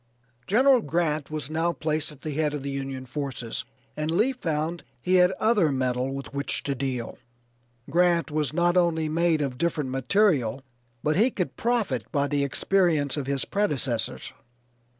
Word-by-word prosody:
General 255 +4 +5
Grant 155 -2 -1
was 155 -2 -3
now 165 +2 +1
placed 155 -1 -2
at 145 -2 -15
the 155 - -4
head 150 0 0
of 140 - -5
the 140 - -3
Union 135 -1 -4
forces 130 -3 -4 0.3
and 150 +1 -2
Lee 210 +11 +3
found 165 -6 -2 0.2
he 185 +1 +2
had 180 0 +6
other 200 -6 +2
metal 130 0 0
with 135 0 -6
which 140 +1 -2
to 140 - -1
deal. 130 -3 -4 0.7
Grant 175 -2 +2
was 150 -1 0
not 175 +2 +2
only 165 -3 +2
made 165 0 +2
of 130 -3 -4
different 155 -6 -1
material 135 - +2 0.4
but 150 +2 +1
he 225 +6 +5
could 185 -7 -3
profit 215 - -1
by 140 -1 +1
the 145 -1 0
experience 155 0 +1
of 145 -3 -3
his 140 -1 -1
predecessors. 140 - -1
155 Hz, 165 wpm, -26 LUFS, 135-175 Hz, 0.7 s, had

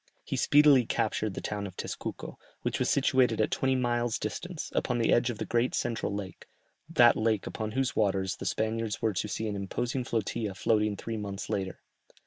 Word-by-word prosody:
He - - -3
speedily 145 -3 +6
captured 110 -3 -1
the - - -4
town 105 -1 -3
of 95 - -12
Tezcuco, - - -5 0.3
which - - -1
was - - +1
situated 130 -4 +3
at 110 - +2
twenty 130 0 +1
miles' 120 -2 0
distance, 165 - -5
upon 125 - 0
the 115 - +3
edge 120 +1 +3
of 120 - -3
the - - -3
great 120 +2 +1
central 115 -3 -1
lake, 100 -2 -6 0.4
that 120 -8 +6
lake 110 -2 +1
upon 110 -1 -4
whose 135 +2 0
waters 95 -2 +1
the - - -5
Spaniards 110 -1 -1
were 110 -2 +2
to 100 - -2
see 110 +1 -3
an 105 - -2
imposing 120 +6 -2
flotilla 110 -3 -2
floating 105 +1 +1
three 115 +2 -4
months 100 -1 -5
later. 95 -1 -3
110 Hz, 190 wpm, -29 LUFS, 105-120 Hz, 0.4 s, speedily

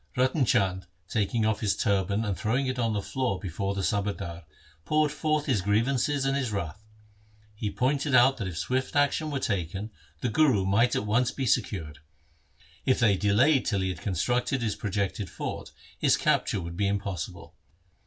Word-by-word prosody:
Ratan 130 +2 +2
Chand, 95 -6 +1 0.2
taking 110 +2 0
off 110 -1 +1
his 105 -3 0
turban 100 +2 +1
and 100 -3 -1
throwing 125 +8 0
it 130 -1 -2
on 115 -2 +1
the 100 -2 -2
floor 130 -8 -1
before 100 +1 -3
the 95 - -2
subadar, 100 -6 -2 0.4
poured 150 - +2
forth 155 0 0
his 125 -8 +1
grievances 125 +7 +1
and 135 0 +1
his 130 -5 -1
wrath. 100 0 -4 0.7
He 105 0 -3
pointed 135 +5 0
out 130 +2 +6
that 105 -6 -3
if 85 -3 -6
swift 130 +10 -2
action 145 +2 +2
were 145 - -2
taken, 100 -1 -2 0.3
the - - 0
Guru 120 -7 +3
might 110 +6 +3
be - - +2
at 105 - -5
once 120 +4 +1
secured. 90 - -1 0.8
If 130 - +2
they 110 -5 +4
delayed 115 +9 +3
till 100 -3 +1
he 95 - 0
had 90 -2 -5
constructed 120 - 0
his 105 -3 -1
projected 100 -1 -2
fort, - - -6 0.3
his - - +4
capture 100 - +1
would 85 0 -6
be 100 +2 +1
impossible. 100 -5 -4
105 Hz, 175 wpm, -27 LUFS, 100-130 Hz, 0.8 s, out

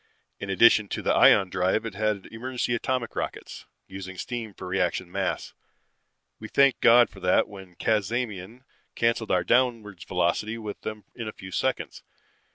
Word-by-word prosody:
In 100 - -6
addition 105 +1 +5
to - - -4
the - - +2
ion 95 -2 +5
drive 95 +5 0
it 115 - -5
had 105 -1 -1
emergency 120 +1 -3
atomic 120 0 -2
rockets, - - -6 0.2
using 95 -1 -9
steam 115 -1 -5
for - - -9
reaction 90 -1 -1
mass. 95 0 -3 0.9
We 110 - -7
thanked 140 +2 +3
God 120 +1 +7
for 95 - -15
that 90 -1 +2
when 95 -3 -12
Cazamian 110 +2 -2 0.3
canceled 115 -1 0
our 90 -1 +2
downwards 115 -7 0
velocity 95 +5 -1
with 105 -2 -7
them 110 -1 -6
in 115 -3 -6
a - - -4
few 95 - -11
seconds. - - -2
105 Hz, 160 wpm, -26 LUFS, 95-115 Hz, 0.9 s, God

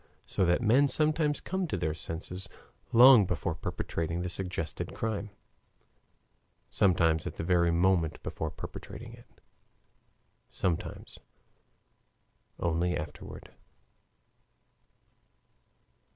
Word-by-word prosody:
So 95 - 0
that 90 +7 +2
men 130 +6 +5
sometimes 155 0 +2
come 190 -1 -3
to - - -2
their 80 0 -1
senses 85 +4 -6 0.4
long 120 -4 +8
before 85 -5 -2
perpetrating 85 +1 -3
the 90 - -3
suggested 85 -2 -4
crime, 110 -2 -3 1.4
sometimes 85 -4 +2
at - - -6
the - - -4
very 85 0 +3
moment 85 -1 +1
before 80 - -4
perpetrating - - -9
it, - - -15 1.2
sometimes 85 -3 -3 1.4
only 85 +1 0
afterward. 75 -1 -8
90 Hz, 95 wpm, -30 LUFS, 85-110 Hz, 1.4 s, long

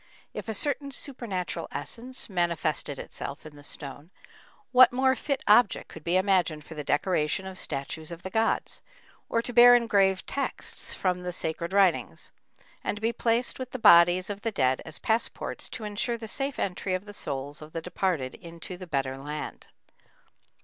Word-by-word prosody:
If - - -6
a 220 - -2
certain 285 +4 0
supernatural 235 -10 -4
essence 255 +2 -4
manifested 170 -6 0
itself 140 +2 -7
in 155 -1 -11
the 145 - -14
stone, 145 +2 -8 0.6
what 255 -1 +8
more 260 +1 +3
fit 280 -1 -2
object 215 +1 +4
could 160 - -11
be 175 +3 +2
imagined 185 -5 +2
for 160 - -10
the 150 -1 -5
decoration 150 +3 +1
of 190 0 -7
statues 155 0 -4
of 170 0 -8
the 190 - -6
gods, 225 +2 +1 0.5
or 230 - +1
to 245 - -4
bear 245 +1 +9
engraved 200 -5 +3
texts 275 - -3
from 180 -1 0
the 180 0 -3
sacred 170 0 -3
writings, 195 -3 +2 0.5
and - - -2
to - - -9
be 230 +1 +2
placed 235 +2 +1
with 255 -1 -6
the - - -2
bodies 180 -3 +6
of 200 0 -6
the 225 - 0
dead 130 -11 +1
as 160 - -4
"passports" 225 +1 -1
to 225 - -7
ensure 210 +3 -1
the 225 -1 -7
safe 275 +4 0
entry 185 0 -1
of 185 +2 -5
the 205 - -9
souls 140 -4 -3
of 155 +1 -10
the 165 - -3
departed 170 -5 -1
into 170 +1 -9
the 185 0 -9
better 135 -3 -2
land? 150 +2 -6
185 Hz, 175 wpm, -28 LUFS, 160-230 Hz, 0.6 s, bear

